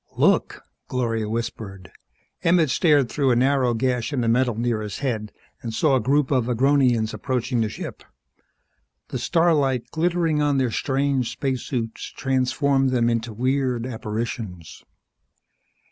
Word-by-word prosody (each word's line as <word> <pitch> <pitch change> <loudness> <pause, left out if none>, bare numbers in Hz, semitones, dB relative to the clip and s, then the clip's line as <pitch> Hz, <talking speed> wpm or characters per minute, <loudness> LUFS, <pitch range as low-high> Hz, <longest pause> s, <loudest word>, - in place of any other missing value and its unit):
"Look!" - - +2 0.2
Gloria 115 -4 -1
whispered. 100 -6 -5 0.5
Emmett 165 -4 +3
stared 145 -6 +3
through 135 +2 0
a 120 - +4
narrow 130 -1 +2
gash 125 +1 -1
in 135 -4 -1
the 115 - 0
metal 120 0 +2
near 115 -1 -1
his 105 -2 -5
head 110 -5 -2 0.3
and 115 -2 -5
saw 150 -4 +3
a - - +3
group 140 +4 +1
of 125 -4 +2
Agronians 125 -3 +2
approaching 125 -2 -1
the 110 - 0
ship. - - -7 1.1
The 130 - -3
starlight, 140 -4 +1
glittering 165 -2 +1
on 145 -1 +2
their 130 -3 +1
strange 135 -1 0
spacesuits, 125 -4 -3
transformed 135 +1 +1
them 120 -2 +2
into 115 0 -2
weird 125 +1 0
apparitions. 110 -6 -5
125 Hz, 135 wpm, -23 LUFS, 115-140 Hz, 1.1 s, a